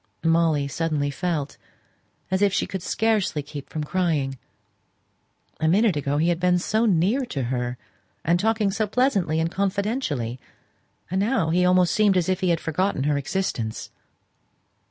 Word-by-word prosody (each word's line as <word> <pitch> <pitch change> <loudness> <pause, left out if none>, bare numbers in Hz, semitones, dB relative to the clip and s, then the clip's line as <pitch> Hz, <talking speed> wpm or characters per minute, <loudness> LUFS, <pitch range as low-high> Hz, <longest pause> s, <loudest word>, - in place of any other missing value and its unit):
Molly 165 -3 +2
suddenly 145 -1 -1
felt 155 -2 -3 0.7
as 190 +1 +1
if 200 -1 +4
she 200 - 0
could 190 -2 -5
scarcely 210 -7 0
keep 140 0 -9
from 155 - -4
crying 150 -6 -1 1.2
a 160 - +1
minute 200 +2 +3
ago 145 0 -1
he 165 +3 +2
had 170 -1 0
been 180 0 +3
so 220 +6 +1
near 200 +8 +2
to 135 - -3
her, 125 0 -2 0.5
and 170 +2 +3
talking 215 0 +1
so 215 +2 -1
pleasantly 200 - +1
and 165 +1 0
confidentially; 195 - -2 0.7
and 190 - 0
now 200 -6 +1
he 180 +2 +3
almost 180 -1 +4
seemed 205 -3 +3
as 180 0 +1
if 185 0 +1
he 185 - 0
had 170 -1 +2
forgotten 165 -2 -1
her 145 +1 +1
existence. 135 -8 -3
175 Hz, 155 wpm, -24 LUFS, 150-195 Hz, 1.2 s, if